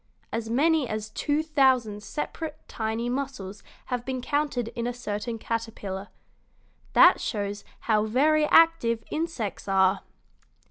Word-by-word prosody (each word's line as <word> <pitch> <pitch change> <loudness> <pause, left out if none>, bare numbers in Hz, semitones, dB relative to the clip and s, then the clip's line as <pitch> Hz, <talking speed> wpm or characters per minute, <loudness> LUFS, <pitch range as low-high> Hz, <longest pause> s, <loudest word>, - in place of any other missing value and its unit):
As 225 0 -3
many 300 +3 +3
as 215 0 -4
two 295 +7 0
thousand 260 -9 +2
separate, 305 +5 -5
tiny 225 +1 -2
muscles 245 -7 -4 0.2
have 250 -2 -3
been 260 0 -3
counted 275 -3 -1
in 235 0 -4
a 245 - -3
certain 225 -1 -4
caterpillar. 215 -4 -4 0.9
That - - +7
shows 205 -2 -3 0.2
how 215 -2 +2
very 300 +7 +3
active 300 -11 +4
insects 310 - -3
are." 190 0 +3
235 Hz, 125 wpm, -26 LUFS, 215-285 Hz, 0.9 s, That